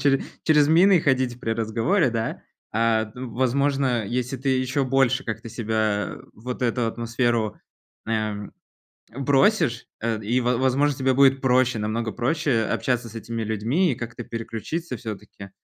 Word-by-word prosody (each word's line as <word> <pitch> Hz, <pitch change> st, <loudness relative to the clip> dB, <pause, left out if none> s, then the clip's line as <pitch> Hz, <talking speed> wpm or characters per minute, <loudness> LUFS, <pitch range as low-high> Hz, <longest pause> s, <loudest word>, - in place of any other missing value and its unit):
чере 135 Hz, -2 st, +3 dB, 0.2 s
через 150 Hz, -2 st, +4 dB
мины 175 Hz, +3 st, +6 dB
ходить 130 Hz, -3 st, 0 dB
при 115 Hz, -, -3 dB
разговоре, 115 Hz, -, +1 dB
да? 115 Hz, 0 st, -3 dB, 0.3 s
А, 110 Hz, -1 st, +1 dB
ну, 125 Hz, -2 st, -7 dB
возможно, 130 Hz, -1 st, +1 dB
если 125 Hz, +4 st, -2 dB
ты 135 Hz, +2 st, -1 dB
еще 130 Hz, +1 st, +1 dB
больше 135 Hz, 0 st, +2 dB
как-то 115 Hz, +1 st, -5 dB
себя 110 Hz, -2 st, -1 dB, 0.2 s
в 110 Hz, -, -19 dB
вот 125 Hz, 0 st, -4 dB
эту 120 Hz, -1 st, +1 dB
атмосферу, 115 Hz, -1 st, -1 dB, 0.5 s
эм, 105 Hz, -2 st, -2 dB, 0.6 s
бросишь, 140 Hz, -, +2 dB
э, 115 Hz, -1 st, -1 dB
и, 120 Hz, +5 st, +1 dB
во 125 Hz, 0 st, +1 dB
возможно, 135 Hz, +2 st, +2 dB
тебе 130 Hz, 0 st, +2 dB
будет 135 Hz, 0 st, +5 dB
проще, 130 Hz, -2 st, +2 dB
намного 110 Hz, +1 st, -2 dB
проще 125 Hz, -1 st, 0 dB
общаться 120 Hz, +1 st, -1 dB
с 110 Hz, -, -14 dB
этими 115 Hz, 0 st, -4 dB
людьми 115 Hz, -, +1 dB
и -, -, -1 dB
как-то 115 Hz, 0 st, -7 dB
переключиться 120 Hz, +7 st, -5 dB
всё-таки. 105 Hz, -3 st, -8 dB
120 Hz, 150 wpm, -24 LUFS, 115-135 Hz, 0.6 s, мины